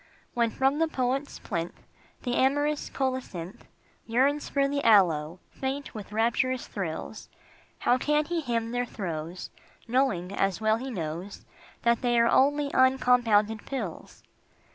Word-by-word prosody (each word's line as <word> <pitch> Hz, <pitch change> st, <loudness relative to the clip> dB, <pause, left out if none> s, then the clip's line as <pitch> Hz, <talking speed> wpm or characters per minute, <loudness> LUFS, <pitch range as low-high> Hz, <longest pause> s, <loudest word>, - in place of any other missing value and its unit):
When 235 Hz, -1 st, +2 dB
from 270 Hz, +5 st, +1 dB
the 325 Hz, -, +3 dB
poet's 270 Hz, -1 st, -2 dB
plinth 170 Hz, -4 st, -5 dB, 0.4 s
The 245 Hz, -, -1 dB
amorous 290 Hz, +3 st, +1 dB
colocynth 255 Hz, -10 st, -4 dB, 0.4 s
Yearns 270 Hz, +6 st, +1 dB
for 275 Hz, -1 st, +2 dB
the 280 Hz, 0 st, -2 dB
aloe, 170 Hz, -6 st, +4 dB
faint 270 Hz, +1 st, -4 dB
with 210 Hz, -3 st, -8 dB
rapturous 235 Hz, +3 st, 0 dB
thrills, 190 Hz, +2 st, -5 dB, 0.5 s
How 250 Hz, -, +2 dB
can 300 Hz, +2 st, +2 dB
he 340 Hz, +1 st, -1 dB
hymn 230 Hz, -4 st, -2 dB
their 245 Hz, 0 st, -1 dB
throes 170 Hz, -4 st, -5 dB, 0.4 s
Knowing, 225 Hz, -8 st, +1 dB
as 195 Hz, -2 st, 0 dB
well 220 Hz, 0 st, +2 dB
he 260 Hz, +3 st, -5 dB
knows, 175 Hz, -2 st, -5 dB, 0.4 s
That 235 Hz, 0 st, +3 dB
they 240 Hz, -1 st, +2 dB
are 235 Hz, -, +5 dB
only 285 Hz, +3 st, +3 dB
uncompounded 245 Hz, -5 st, +3 dB
pills? 225 Hz, -11 st, -6 dB
240 Hz, 135 wpm, -27 LUFS, 200-270 Hz, 0.5 s, are